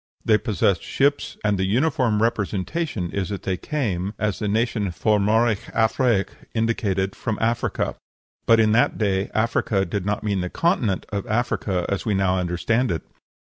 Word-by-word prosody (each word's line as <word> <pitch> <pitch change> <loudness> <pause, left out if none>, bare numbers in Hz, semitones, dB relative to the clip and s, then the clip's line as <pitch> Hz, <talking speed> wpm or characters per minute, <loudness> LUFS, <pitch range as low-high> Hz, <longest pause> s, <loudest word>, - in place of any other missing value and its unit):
They 110 -1 +4
possessed 100 -5 +1
ships, 140 +1 0
and 105 -2 +1
the - - +1
uniform 120 -2 +2
representation 105 - -1
is 100 -2 -2
that 100 -2 -5
they 95 - 0
came, 100 - -2
as 105 -2 -1
the 105 - -2
name 110 +3 +2
F'omoraig 105 +2 +1
Afraic 110 -2 +2 0.3
indicated, 100 -4 0
from 110 -4 -3
Africa. 115 +1 0 0.5
But 115 0 +6
in 110 -1 +4
that 115 +3 +3
day 100 -2 0
Africa 110 -3 +1
did 95 +2 -3
not 105 +2 -2
mean 100 -3 0
the 90 - -3
continent 125 - 0
of 100 -2 -4
Africa, 105 -5 0
as 100 - -2
we 105 -3 0
now 95 -1 +2
understand 90 +8 0
it. 80 - -2
105 Hz, 160 wpm, -23 LUFS, 95-115 Hz, 0.5 s, But